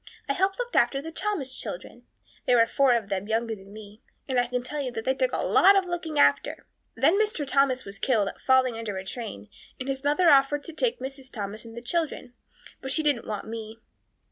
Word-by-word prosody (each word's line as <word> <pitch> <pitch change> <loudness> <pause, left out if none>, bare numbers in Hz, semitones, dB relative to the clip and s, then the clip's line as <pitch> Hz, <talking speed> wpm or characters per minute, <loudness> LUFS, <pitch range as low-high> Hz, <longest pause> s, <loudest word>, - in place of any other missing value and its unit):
I 280 - +1
helped 380 +5 +1
look - - -4
after 275 - +3
the 320 +4 -7
Thomas 330 -8 -2
children 230 +7 -7 0.4
there 245 - +5
were 230 - +6
four 260 +1 +3
of 220 -4 -2
them 195 0 -2
younger 225 +1 0
than 195 -2 -12
me 210 +1 -12 0.3
and 255 -2 +1
I 245 - +1
can 250 0 -2
tell 295 +3 -4
you 260 -2 -3
they 240 +3 -1
took - - 0
a - - -1
lot 395 +1 +6
of 390 -1 +3
looking 345 -3 -4
after. 140 0 +2 0.3
Then 305 - +3
Mr. 420 -9 0
Thomas 270 -1 +2
was 200 0 -8
killed 215 -6 +1 0.2
falling 260 -2 +4
under 215 -4 -4
a 190 - -6
train 190 - -7 0.3
and 260 - -5
his 270 0 -3
mother 295 +5 +3
offered 285 0 +5
to 330 - -9
take 485 +7 0
Mrs. 270 -1 -8
Thomas 210 0 -6
and 225 0 -11
the 235 - -7
children, 295 -4 -2 0.5
but 265 - -4
she 315 - +3
didn't 285 -6 0
want 210 -2 -4
me. 220 0 -7
260 Hz, 220 wpm, -26 LUFS, 225-295 Hz, 0.5 s, were